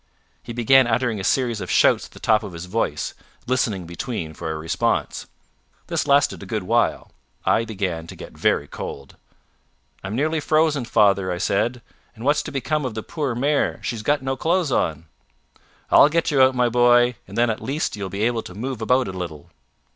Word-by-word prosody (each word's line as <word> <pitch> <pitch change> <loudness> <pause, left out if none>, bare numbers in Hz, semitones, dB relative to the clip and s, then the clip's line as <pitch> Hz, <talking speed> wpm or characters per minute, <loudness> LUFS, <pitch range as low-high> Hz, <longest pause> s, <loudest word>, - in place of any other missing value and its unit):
He - - -9
began 120 +2 +4
uttering 120 -2 0
a - - -5
series 120 -1 0
of - - -6
shouts - - +4
at - - -27
the - - -13
top 110 -1 +3
of 100 -4 -8
his 85 +1 -7
voice, 90 - -2 0.3
listening 115 -7 0
between 85 -2 -5
for 80 +1 -6
a 80 - -3
response. 95 +9 -1 0.6
This - - -2
lasted 140 0 +3
a - - -9
good 110 -4 -2
while. 90 - 0 0.3
I 115 - +2
began 95 -7 -3
to - - -9
get - - -11
very - - +1
cold. 70 -1 -8 0.9
"I'm 95 +2 -4
nearly 155 +5 0
frozen, 155 -3 +1
father," 100 -4 +3
I 90 - -2
said, 115 +6 -1 0.3
"and 115 +2 -9
what's 145 +1 +3
to - - -7
become 150 +2 -1
of 125 -4 -4
the 110 - -4
poor 145 -7 -3
mare 140 +4 0
she's 115 -3 -3
got 145 +3 0
no 135 0 -1
clothes 165 +2 0
on?" 80 -7 0 0.9
"I'll 145 - +7
get 165 +1 0
you 140 -2 +3
out, 130 0 +5
my 125 -1 +3
boy; 120 +1 +4
and - - -9
then 120 0 +3
at 110 - -5
least 145 -1 -2
you 105 - -9
will 95 - -3
be 100 +3 -3
able 115 0 +1
to 90 - -11
move 125 +2 -4
about 125 +3 +2
a - - -4
little." 85 -5 -7
115 Hz, 200 wpm, -22 LUFS, 95-135 Hz, 0.9 s, I'll